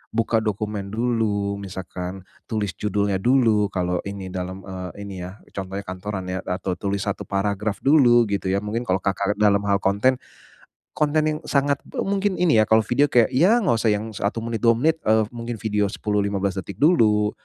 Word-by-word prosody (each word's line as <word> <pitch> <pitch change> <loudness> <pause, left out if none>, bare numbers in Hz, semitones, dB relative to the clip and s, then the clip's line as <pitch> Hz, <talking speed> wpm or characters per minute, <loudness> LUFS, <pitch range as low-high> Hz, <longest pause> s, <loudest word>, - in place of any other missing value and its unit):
buka 115 0 +2
dokumen 105 -2 -3
dulu, 110 -4 0
misalkan 95 -1 -6 0.2
tulis 105 -4 -2
judulnya 100 -1 0
dulu, 115 -3 +3
kalau 90 -2 -1
ini, 100 -2 -6
dalam, 95 +1 -5
eee, 95 -2 -6
ini 95 -2 -7
ya, 90 +2 -8 0.2
contohnya 95 +1 -5
kantoran 95 +1 -5
ya, 95 - -2
atau 90 +1 -2
tulis 100 -1 -2
1 100 - -4
paragraf 100 +1 -1
dulu 125 -5 +6
gitu 100 -1 -1
ya. 95 - +1
Mungkin 115 +3 -3
kalau 95 +1 +1
Kakak 100 +1 0
dalam 100 -1 +3
hal 100 - +3
konten, 105 +7 +3 0.8
konten 150 0 +1
yang 155 0 -1
sangat, 140 0 +1
pe - - -3
mungkin 200 -1 0
ini 170 -10 +3
ya, 110 - +5
kalau 110 0 +4
video 135 +7 +2
kayak, 120 -5 +3
ya 180 - +4
enggak 120 - +2
usah 110 - +2
yang 110 +2 -5
1 105 +2 -2
menit, 115 -1 -3
2 115 -1 +5
menit, 160 +7 +1
eee, 110 0 +4
mungkin 120 0 -5
video 105 -2 +1
10, 105 +1 -2
15 100 -1 -1
detik 100 +2 -7
dulu 105 -10 +4
105 Hz, 185 wpm, -23 LUFS, 100-120 Hz, 0.8 s, dulu